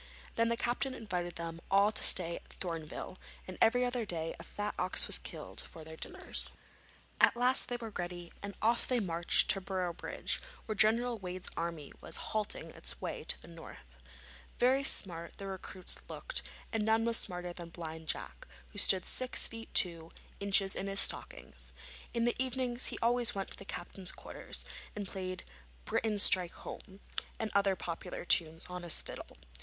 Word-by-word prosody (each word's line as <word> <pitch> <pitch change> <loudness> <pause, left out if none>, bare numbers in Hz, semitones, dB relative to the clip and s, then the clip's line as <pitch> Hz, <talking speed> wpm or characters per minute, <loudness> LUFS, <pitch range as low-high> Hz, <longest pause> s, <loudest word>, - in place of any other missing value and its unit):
Then 230 0 +2
the 235 - +1
captain 255 +3 -1
invited 180 -7 -3
them 165 0 -5
all 200 +2 +5
to 215 - -1
stay 170 -2 +3
at - - -14
Thorneville, 165 0 -4 0.3
and 185 - -6
every 245 +2 +5
other 245 -1 0
day 165 -5 -3
a - - -8
fat 210 0 -4
ox - - +3
was - - +1
killed - - -3
for 160 - -10
their 160 0 -9
dinners. - - +3 0.7
At - - +6
last 250 +2 +3
they 245 - -2
were 225 -2 -6
ready, 175 -2 -5
and 200 0 -6
off 235 +2 +3
they 250 -1 +2
marched 175 -4 +2
to 195 - -2
Boroughbridge, 185 -3 -2 0.2
where 220 - -2
General 230 +3 +3
Wade's 185 -1 -4
army 165 -3 -4
was - - -3 0.2
halting 215 -1 -2
on - - -15
its - - -3
way - - -4
to - - +8
the - - -12
north. 165 - -11 0.7
Very 260 +3 +4
smart 170 -9 +2
the 200 - -6
recruits 190 -1 -3
looked, - - +1 0.3
and 225 - +1
none 220 +1 +3
was 230 0 +6
smarter 180 -1 -2
than 170 -1 -8
Blind 160 -1 -7
Jack, - - -3 0.2
who 205 - -2
stood 190 -3 +7
six 255 -1 +3
feet 225 0 -5
two 165 -3 +3 0.3
inches 195 -1 +3
in 195 - -3
his 195 0 0
stockings. - - -3 0.4
In 235 0 +1
the 240 - +2
evenings 255 -1 +1
he - - +1
always 240 0 +4
went 195 -1 -3
to - - 0
the 195 - -8
captain's 185 0 -3
quarters, - - -4 0.3
and 205 -2 -4
played 185 -1 -4 0.4
'Britons, 210 -2 +2
strike 180 -2 +5
home,' 195 -1 -10 0.4
and 220 -1 -2
other 200 -1 +3
popular 170 0 -5
tunes, 165 -1 +3
on 180 0 -5
his 175 -2 0
fiddle. - - -8
195 Hz, 180 wpm, -33 LUFS, 175-225 Hz, 0.7 s, to